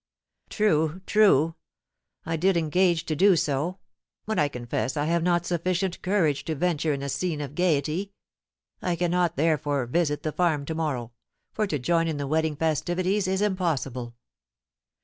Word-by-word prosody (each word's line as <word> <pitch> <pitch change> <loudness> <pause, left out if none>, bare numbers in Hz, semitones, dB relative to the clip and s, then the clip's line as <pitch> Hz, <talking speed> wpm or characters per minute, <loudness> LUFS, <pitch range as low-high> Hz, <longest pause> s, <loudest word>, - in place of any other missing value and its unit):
"True, 160 -4 +1
true, 165 -7 +4 0.7
I 165 - -1
did 185 +3 +2
engage 170 +1 +2
to 155 - -2
do 195 +4 +5
so; 155 +4 -1 0.5
but 220 0 -1
I 150 - +3
confess 125 -1 -3
I 145 - 0
have 170 +2 +1
not 175 0 +1
sufficient 180 +1 -1
courage 180 -7 +1
to 160 - -2
venture 160 0 0
in 140 -1 -3
a - - -3
scene 160 +2 -2
of 145 -2 -5
gaiety. 170 +3 0 0.7
I 180 -1 0
cannot, 175 0 +1
therefore, 145 -4 +1
visit 150 +3 0
the 155 - -1
farm 155 -4 0
to 160 - -3
morrow, 140 -8 -2 0.4
for 215 -1 0
to 155 - -1
join 165 +5 +1
in 160 -2 -2
the 145 - -3
wedding 155 +1 0
festivities 175 +6 0
is 190 +2 0
impossible." 140 - -2
165 Hz, 160 wpm, -26 LUFS, 145-180 Hz, 0.7 s, do